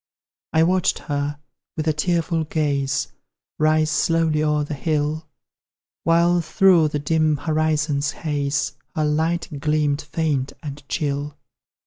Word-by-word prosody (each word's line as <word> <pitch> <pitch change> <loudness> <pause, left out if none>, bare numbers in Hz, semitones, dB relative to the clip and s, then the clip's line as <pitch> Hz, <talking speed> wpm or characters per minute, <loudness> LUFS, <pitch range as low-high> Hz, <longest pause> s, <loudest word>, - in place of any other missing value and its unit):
I 160 - +4
watched 185 +2 +2
her, 145 -1 -3 0.4
with 155 0 -2
a 155 - +3
tearful 165 +1 0
gaze, 140 - -1 0.5
Rise 155 0 +3
slowly 165 -2 +2
o'er 150 -1 +1
the 145 - -5
hill, 155 +1 -1 0.8
While 170 +1 +4
through 170 0 +4
the 150 - -2
dim 155 +1 +1
horizon's 155 -1 0
haze 145 -3 -2 0.2
Her 155 -2 +1
light 160 0 -1
gleamed 150 0 +1
faint 150 -3 -1
and 145 -1 -6
chill. 145 -1 -2
155 Hz, 120 wpm, -22 LUFS, 145-160 Hz, 0.8 s, I